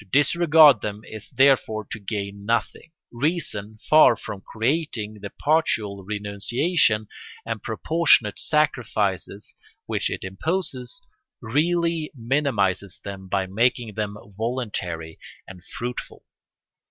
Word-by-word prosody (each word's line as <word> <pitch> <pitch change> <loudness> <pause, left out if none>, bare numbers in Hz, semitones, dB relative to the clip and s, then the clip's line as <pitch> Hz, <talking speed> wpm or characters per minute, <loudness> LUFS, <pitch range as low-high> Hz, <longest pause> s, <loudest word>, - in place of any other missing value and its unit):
To - - -16
disregard 150 - +6
them 105 0 -4
is 110 -1 -8
therefore 130 -5 +3
to 110 - -4
gain 100 -1 -5
nothing: 115 +8 -2 0.2
reason, 120 - -2
far 155 -6 +7
from 100 -2 -7
creating 110 -3 -2
the 100 - -6
partial 110 -11 0
renunciation 105 - 0 0.4
and 115 -2 -4
proportionate 120 - +2
sacrifices 110 - 0 0.3
which - - -1
it - - -5
imposes, 180 - -3 0.3
really 165 +6 0
minimises 115 -8 0
them 95 -1 -7
by 95 0 0
making 115 +3 0
them 105 0 -3 0.2
voluntary 100 -9 -3 0.3
and 90 -2 -12
fruitful. 120 +5 -6
110 Hz, 105 wpm, -24 LUFS, 100-150 Hz, 0.4 s, far